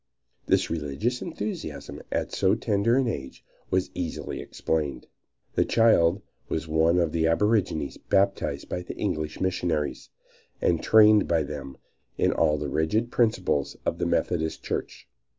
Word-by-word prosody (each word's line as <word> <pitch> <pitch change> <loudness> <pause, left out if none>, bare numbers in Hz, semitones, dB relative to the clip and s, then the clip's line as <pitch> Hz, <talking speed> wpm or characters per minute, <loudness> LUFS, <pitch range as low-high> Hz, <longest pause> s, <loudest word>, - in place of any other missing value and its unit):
This - - +2
religious 85 - -2
enthusiasm 175 +2 -5
at - - -1
so - - +2
tender 105 +4 +1
an 135 -2 +2
age 70 - -5 0.2
was 95 0 0
easily 85 -3 -4
explained. 75 -5 -2 0.5
The - - +3
child 100 -4 +3 0.3
was 80 - -2
one 80 +2 +3
of 85 -3 +2
the 80 0 +1
aborigines 90 -5 +1
baptized 100 0 0
by 90 - -3
the - - -8
English 75 0 -2
missionaries, 85 -5 -1 0.5
and 85 -2 +1
trained 105 -1 +6
by 80 -2 +2
them 70 -2 -7 0.4
in - - +3
all 75 - +2
the 75 0 -3
rigid 105 - 0
principles 95 - +1
of - - -1
the - - 0
Methodist 80 -2 -1
Church. - - -4
85 Hz, 140 wpm, -26 LUFS, 80-105 Hz, 0.5 s, trained